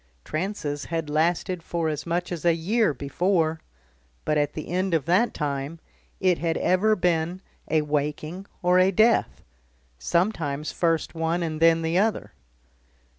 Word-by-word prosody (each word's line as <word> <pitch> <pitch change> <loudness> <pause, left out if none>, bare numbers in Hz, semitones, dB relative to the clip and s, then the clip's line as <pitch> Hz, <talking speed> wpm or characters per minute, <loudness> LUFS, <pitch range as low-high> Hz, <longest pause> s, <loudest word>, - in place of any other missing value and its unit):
Trances 155 -4 -3
had 165 -2 -3
lasted 170 +3 0
for 165 0 -2
as 150 0 -3
much 175 +2 -1
as 170 -3 -4
a 170 -1 +4
year 205 +5 +1
before 160 +3 0 0.6
but 150 - +1
at 145 -1 +1
the 155 - -6
end 185 0 0
of 150 -5 0
that 190 +8 +3
time 145 +1 -3 0.4
it 185 -3 +2
had 165 -1 0
ever 205 +4 +3
been 175 -1 0 0.3
a 155 -1 +2
waking 150 +5 -3 0.2
or 180 +1 +4
a 185 +1 +5
death; 220 +5 +2 0.6
sometimes 155 - -1
first 165 -2 0
one 165 +1 -1
and 155 -2 -3
then 165 0 +5
the 165 +3 +1
other. 220 +2 0
165 Hz, 150 wpm, -25 LUFS, 155-180 Hz, 0.6 s, a